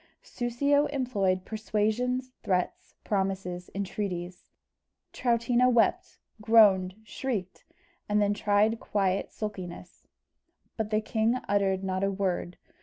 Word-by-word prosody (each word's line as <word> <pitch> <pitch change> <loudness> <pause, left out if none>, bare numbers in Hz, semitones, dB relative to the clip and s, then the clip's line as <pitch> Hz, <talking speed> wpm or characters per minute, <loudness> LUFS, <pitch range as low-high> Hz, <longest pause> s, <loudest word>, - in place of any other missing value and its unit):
Soussio 280 +5 +1
employed 205 -10 0
persuasions, 225 +4 -1
threats, 180 -2 -2
promises, 190 -3 -2
entreaties. 185 -3 -4 0.6
Troutina 240 +1 +2
wept, 235 -2 +1 0.2
groaned, 205 -4 +5
shrieked, 215 -4 -4 0.4
and 210 0 +3
then 205 0 +2
tried 210 +2 +2
quiet 195 -2 -1
sulkiness; 185 -4 -7 0.7
but 220 -2 -2
the 215 0 +1
king 220 +2 +1
uttered 195 -1 +1
not 190 0 -1
a 195 - +2
word. 190 -3 -2
205 Hz, 105 wpm, -28 LUFS, 190-230 Hz, 0.7 s, groaned